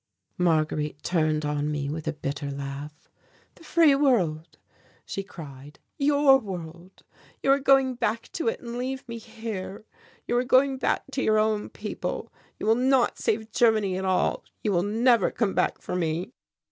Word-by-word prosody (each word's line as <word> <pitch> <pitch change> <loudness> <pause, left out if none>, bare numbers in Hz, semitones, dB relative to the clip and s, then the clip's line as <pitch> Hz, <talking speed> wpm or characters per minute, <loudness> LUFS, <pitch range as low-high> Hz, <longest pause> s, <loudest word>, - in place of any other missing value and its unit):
Marguerite 155 -3 0
turned 155 -3 +1
on 150 0 -1
me 145 -2 -2
with 155 +2 -5
a - - +2
bitter 145 -1 -4
laugh. 140 +2 -7 0.5
"The - - -18
free 325 -3 +5
world," 185 - +1 0.5
she 195 - -4
cried, 145 -6 -11 0.2
"your 285 -1 +5
world. 180 -3 -9 0.4
You 270 - +4
are 275 - +4
going 270 -1 +4
back 230 -2 -2
to 325 - -3
it 225 - 0
and 235 0 -6
leave 260 +1 -4
me 235 0 -6
here. 215 -3 -7 0.4
You 240 - 0
are 245 - +2
going 265 +1 +3
back - - 0
to 270 - -2
your 215 -3 +3
own 215 -1 +1
people - - -5 0.2
you - - -5
will 220 - +5
not 255 +1 +2
save 220 0 -1
Germany 215 -4 +3
at 190 - -3
all 185 -1 +1 0.2
you 210 - +1
will 175 -3 +2
never 225 +2 +3
come 215 -5 -1
back - - 0
for - - -4
me!" 175 +5 -2
205 Hz, 170 wpm, -26 LUFS, 155-245 Hz, 0.5 s, free